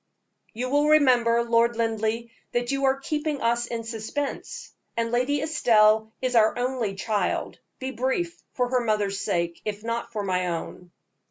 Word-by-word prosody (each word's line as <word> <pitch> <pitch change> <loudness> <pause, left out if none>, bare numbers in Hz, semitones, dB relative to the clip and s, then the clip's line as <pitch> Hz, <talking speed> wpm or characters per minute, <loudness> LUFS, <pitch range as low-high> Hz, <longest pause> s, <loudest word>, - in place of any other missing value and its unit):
"You 250 +3 -3
will 290 +1 +3
remember, 245 -6 +4
Lord 235 0 +3
Linleigh, 225 0 -1 0.2
that 240 +1 0
you 275 0 0
are 265 0 +3
keeping 295 +1 -2
us 235 0 +1
in 230 -1 -4
suspense, 230 +5 -5 0.3
and 230 0 0
Lady 255 +4 +1
Estelle 220 -7 +4
is 255 -1 0
our 220 0 +4
only 245 -5 -1
child. 200 -1 -1 0.2
Be 260 0 -4
brief, 265 +8 -2
for 250 -1 0
her 250 -1 +1
mother's 205 -3 0
sake, 170 -1 -1
if 210 0 -4
not 230 0 -3
for 215 -3 -3
my 185 -2 0
own." 175 +1 -5
235 Hz, 160 wpm, -25 LUFS, 215-260 Hz, 0.3 s, remember